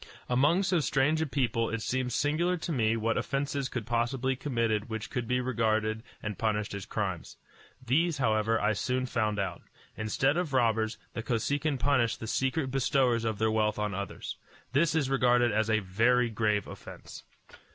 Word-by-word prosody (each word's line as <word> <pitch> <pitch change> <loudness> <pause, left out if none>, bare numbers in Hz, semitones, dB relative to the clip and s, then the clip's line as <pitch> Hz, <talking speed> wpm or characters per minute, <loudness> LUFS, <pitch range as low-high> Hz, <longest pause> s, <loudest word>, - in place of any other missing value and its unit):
Among 145 +10 +3
so 185 -2 +2
strange 145 +4 +2
a 160 - 0
people 120 -5 0
it 115 -1 -3
seemed 130 -1 -1
singular 165 +7 +1
to 165 - -4
me 115 -5 +1
what 115 0 0
offences 140 -1 -2
could 125 -4 -4
possibly 120 +3 0
be - - 0
committed 115 -5 -1
which 110 -1 -5
could 125 -4 -3
be 125 +1 +1
regarded 110 -3 0 0.2
and 105 -2 -4
punished 105 -2 -1
as 100 -2 -6
crimes. - - -4 0.5
These, 155 +6 +2
however, 110 -3 +2
I 105 +1 +2
soon 130 +4 -1
found 110 -4 -1
out. 95 -4 -3 0.3
Instead 135 +8 +1
of 175 -5 -2
robbers, 115 -3 +2 0.2
the 115 - -3
Kosekin 140 +5 0
punished 125 -3 +1
the - - -6
secret 130 +4 -1
bestowers 130 -3 +2
of 110 -2 -1
their 110 +1 +1
wealth 110 -1 +1
on 105 -1 -1
others. 100 +1 -5 0.4
This 155 +3 +3
is 150 -4 +2
regarded 125 -2 +3
as 110 +1 +1
a 110 - +4
very 115 +6 +2
grave 105 -2 +1
offence. - - -10
120 Hz, 175 wpm, -29 LUFS, 110-135 Hz, 0.5 s, a